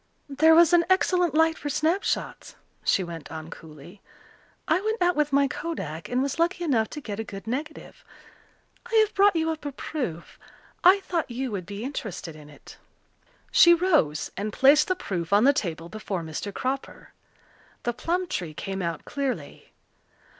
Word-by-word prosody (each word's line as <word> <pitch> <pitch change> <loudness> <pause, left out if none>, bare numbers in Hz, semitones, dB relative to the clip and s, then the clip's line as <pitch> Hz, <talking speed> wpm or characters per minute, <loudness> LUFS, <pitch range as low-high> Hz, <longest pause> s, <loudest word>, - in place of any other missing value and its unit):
"There 315 +3 +5
was 340 0 +6
an 345 -1 +6
excellent 360 -4 +2
light 320 0 +3
for 290 - -4
snapshots," 325 +7 -1 0.3
she 190 - +2
went 170 -3 -8
on 160 0 -8
coolly. 160 +5 -13 0.7
"I 320 +4 +2
went 440 +2 -2
out 355 0 +2
with 300 -1 +1
my 280 0 +3
kodak 170 - -5
and 250 +2 +1
was 280 +3 -3
lucky 350 +1 +1
enough 240 -9 +1
to 300 - -7
get 210 -5 -6
a - - -2
good 195 -1 -9
negative. 285 +7 -6 0.9
I - - 0
have 435 -1 +4
brought 400 -1 +4
you 325 0 +1
up 315 -2 -6
a 290 - -4
proof. 250 - -6 0.4
I 380 +3 +6
thought 340 -6 -2
you 250 +1 -4
would 185 -4 -5
be 205 +1 -6
interested 215 - -6
in 150 -1 -13
it." 145 -2 -15 0.7
She 345 0 +7
rose 310 - +1
and 210 +2 -3
placed 280 +7 +5
the 370 - +1
proof 175 - -4
on 205 +2 +5
the 280 +2 +6
table 170 - -3
before 195 -3 -5
Mr. 160 +5 -5
Cropper. 265 +6 -5 0.7
The 240 - -1
plum 345 +9 -1
tree 170 - -5
came 195 +3 -4
out 170 -3 -4
clearly. 275 -2 -5
270 Hz, 175 wpm, -25 LUFS, -, 0.9 s, She